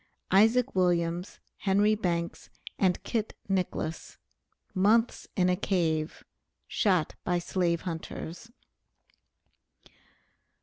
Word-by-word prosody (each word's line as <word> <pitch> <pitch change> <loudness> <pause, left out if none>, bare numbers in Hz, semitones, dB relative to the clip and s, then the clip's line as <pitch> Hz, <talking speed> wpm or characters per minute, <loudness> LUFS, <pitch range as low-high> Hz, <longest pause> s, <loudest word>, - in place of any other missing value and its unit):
ISAAC 225 +6 +4
WILLIAMS, 175 -1 0 0.2
HENRY 205 +2 +3
BANKS, 170 -5 -2 0.3
AND 185 -2 +2
KIT 220 -2 -2
NICKLESS. 180 -4 -2 0.6
MONTHS 215 +5 +2
IN 180 -2 +3
A 180 - +3
CAVE, 165 -5 -1 0.4
SHOT 185 -7 +1
BY 180 -1 +1
SLAVE 175 -1 0
HUNTERS. 175 +5 -6
185 Hz, 85 wpm, -29 LUFS, 170-205 Hz, 0.6 s, ISAAC